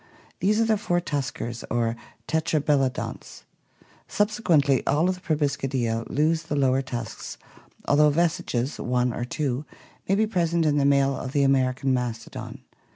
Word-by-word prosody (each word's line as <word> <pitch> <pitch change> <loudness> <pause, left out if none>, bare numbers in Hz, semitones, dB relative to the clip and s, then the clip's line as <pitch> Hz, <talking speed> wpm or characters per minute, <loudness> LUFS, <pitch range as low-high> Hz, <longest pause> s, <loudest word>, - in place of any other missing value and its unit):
These 210 +3 +2
are 225 - +3
the 220 -2 +2
four 175 -4 +1
tuskers 130 -7 -4
or 115 -1 0 0.3
tetrabelodonts. 150 -4 -1 0.6
Subsequently 170 - +2
all 155 +5 +3
of 185 - +2
the 180 - -12
Proboscidea 135 -8 -1
lose 160 +3 +1
the 155 -2 -4
lower 135 -1 +2
tusks 120 -4 -6 0.5
although 150 +1 +5
vestiges, 145 -5 0
one 125 0 0
or 120 - -3
two, 135 0 -2 0.5
may 195 - +4
be 215 +2 +3
present 170 -5 +1
in 150 -1 +2
the 140 - +2
male 140 -1 +3
of 130 0 -6
the 145 - +3
American 135 0 +2
mastodon. 120 -3 -4
140 Hz, 145 wpm, -25 LUFS, 130-165 Hz, 0.6 s, although